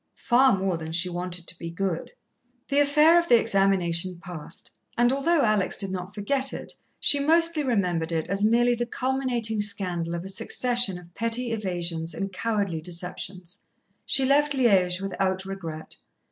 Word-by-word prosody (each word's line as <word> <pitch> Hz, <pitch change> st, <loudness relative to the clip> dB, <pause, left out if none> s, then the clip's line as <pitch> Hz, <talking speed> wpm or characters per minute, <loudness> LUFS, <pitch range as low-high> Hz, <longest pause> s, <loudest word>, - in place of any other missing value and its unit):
Far 255 Hz, -2 st, +3 dB
more 190 Hz, -2 st, -1 dB
than 160 Hz, 0 st, -7 dB
she 170 Hz, +2 st, +3 dB
wanted 175 Hz, 0 st, -5 dB
to 180 Hz, -, -4 dB
be 165 Hz, -, -6 dB
good. 175 Hz, 0 st, -3 dB, 0.6 s
The 280 Hz, -, +2 dB
affair 300 Hz, +4 st, +5 dB
of 340 Hz, -, -2 dB
the 240 Hz, -5 st, +6 dB
examination 185 Hz, -4 st, 0 dB
passed, 175 Hz, -4 st, -6 dB, 0.3 s
and 240 Hz, +2 st, +3 dB
although 300 Hz, +3 st, +2 dB
Alex 215 Hz, -4 st, +1 dB
did 195 Hz, -2 st, -4 dB
not 185 Hz, +1 st, -6 dB
forget 260 Hz, +6 st, -1 dB
it, -, -, -6 dB, 0.3 s
she 285 Hz, -, +4 dB
mostly 330 Hz, +2 st, +2 dB
remembered 180 Hz, -, 0 dB
it 160 Hz, -1 st, -1 dB
as 195 Hz, +2 st, -1 dB
merely 240 Hz, +3 st, +3 dB
the 240 Hz, 0 st, -2 dB
culminating 245 Hz, -4 st, -1 dB
scandal 180 Hz, -5 st, 0 dB
of 170 Hz, -, -5 dB
a -, -, -7 dB
succession 230 Hz, -1 st, +1 dB
of 175 Hz, -1 st, -15 dB
petty 230 Hz, +3 st, -2 dB
evasions 175 Hz, -6 st, -3 dB
and 195 Hz, -1 st, -4 dB
cowardly 200 Hz, -5 st, -2 dB
deceptions. 180 Hz, +2 st, -5 dB, 0.4 s
She 270 Hz, -, +3 dB
left 290 Hz, +2 st, +3 dB
Liège 190 Hz, -8 st, +3 dB
without 190 Hz, -1 st, -2 dB
regret. 165 Hz, -5 st, -7 dB
195 Hz, 160 wpm, -25 LUFS, 180-245 Hz, 0.6 s, the